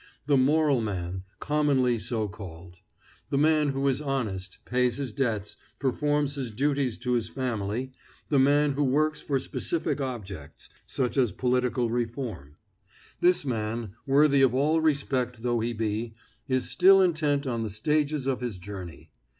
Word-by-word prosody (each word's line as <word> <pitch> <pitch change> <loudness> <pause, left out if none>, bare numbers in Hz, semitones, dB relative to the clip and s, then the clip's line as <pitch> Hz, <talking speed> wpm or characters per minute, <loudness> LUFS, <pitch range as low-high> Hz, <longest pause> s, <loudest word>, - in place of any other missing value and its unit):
The 145 0 +3
moral 140 0 +3
man, 95 -3 -4
commonly 140 -5 +2
so 110 0 -1
called; 90 -4 -10 0.5
the 140 - 0
man 150 0 +3
who 135 0 0
is 135 +1 +1
honest, 110 -10 -3
pays 125 0 +1
his 135 -6 -3
debts, 110 -6 -2 0.2
performs 145 +1 0
his 135 -4 -3
duties 135 +1 0
to 125 0 -2
his 120 -2 0
family; 120 -1 -3 0.4
the 140 - +2
man 145 +2 +4
who 145 +2 0
works 150 +3 +1
for 140 -2 0
specific 160 +1 -2
objects, 100 - -7 0.2
such 130 0 -2
as 125 -5 +3
political 125 -1 0
reform; 115 - -4 0.6
this 180 -3 +3
man, 110 -3 -3
worthy 140 0 +5
of 130 -2 +4
all 155 +4 +2
respect 130 -6 0
though 120 -1 +1
he 115 +2 -1
be, 110 0 -3 0.3
is 130 -2 +1
still 195 +1 +6
intent 155 -6 +2
on 120 -3 -2
the 110 - -2
stages 150 +6 0
of 135 -2 -1
his 120 -6 -3
journey. 90 -4 -9
125 Hz, 150 wpm, -27 LUFS, 110-145 Hz, 0.6 s, still